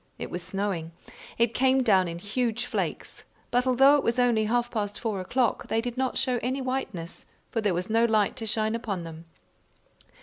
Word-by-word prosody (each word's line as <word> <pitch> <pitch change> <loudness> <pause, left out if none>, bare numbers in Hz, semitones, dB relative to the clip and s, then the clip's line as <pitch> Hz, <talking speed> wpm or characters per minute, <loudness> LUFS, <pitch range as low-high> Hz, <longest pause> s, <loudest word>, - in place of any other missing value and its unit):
It - - -6
was 175 - -4
snowing. 185 -4 -3 0.4
It 235 0 +2
came 260 +1 +3
down 190 -6 +4
in 170 0 -5
huge 230 +5 -1
flakes, - - -4 0.3
but 250 +1 +2
although 270 +3 +6
it 285 - -1
was 230 +1 0
only 240 -3 +3
half 240 +2 0
past 205 -2 -3
four 220 -5 -2
o'clock, 245 +5 0
they 225 - +1
did 240 +1 -3
not 260 0 -1
show 255 -2 +1
any 255 +3 -1
whiteness, 255 -10 -4 0.2
for 225 - -1
there 205 -4 +1
was 180 +1 -2
no 225 +1 +3
light 215 -3 +2
to 225 -3 -4
shine 215 0 +1
upon 210 -6 -3
them. 165 0 -9
225 Hz, 195 wpm, -27 LUFS, 200-250 Hz, 0.4 s, although